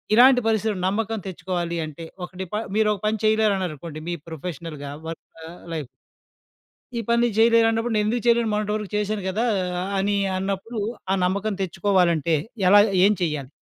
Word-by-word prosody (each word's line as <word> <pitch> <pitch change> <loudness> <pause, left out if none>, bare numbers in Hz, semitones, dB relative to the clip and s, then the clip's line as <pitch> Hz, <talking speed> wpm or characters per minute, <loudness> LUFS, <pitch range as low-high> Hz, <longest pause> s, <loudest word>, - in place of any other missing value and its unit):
ఇలాంటి 250 +2 +7
పరిస్థితిలో 220 -2 +1
నమ్మకం 225 +3 -1
తెచ్చుకోవాలి 175 -2 -3
అంటే, 160 +2 -9 0.2
ఒక - - -16
డిపా 210 +4 -3 0.2
మీరొక 210 -2 +2
పని 215 0 0
చెయలేరన్నారనుకోండి 185 -8 0
మీ 175 - -1
ప్రొఫెషనల్‌గా, 160 -3 -6 0.2
వర్కా 165 0 -9 0.3
లైఫ్ 150 -5 -4 1.1
"ఈ - - 0
పని 235 0 +3
నేను 235 -4 0
జెయలేనన్నప్పుడు 225 0 +4
నేనెందుకు 215 +3 0
చెయలేను, 235 -1 +3
మొన్నటి 210 0 -1
వరకు 210 -2 -4
చేశాను 210 -1 -1
కదా!" 215 +6 0 0.5
అనీ 200 +1 +1 0.2
అన్నప్పుడూ 195 +4 -3 0.3
ఆ - - +3
నమ్మకం 200 +3 -1
తెచ్చుకోవాలంటే 175 -4 +2 0.3
ఎలా 205 +1 +8 0.2
ఏం 210 - +5
చేయాలి? 150 -6 -2
200 Hz, 140 wpm, -23 LUFS, 170-220 Hz, 1.1 s, ఎలా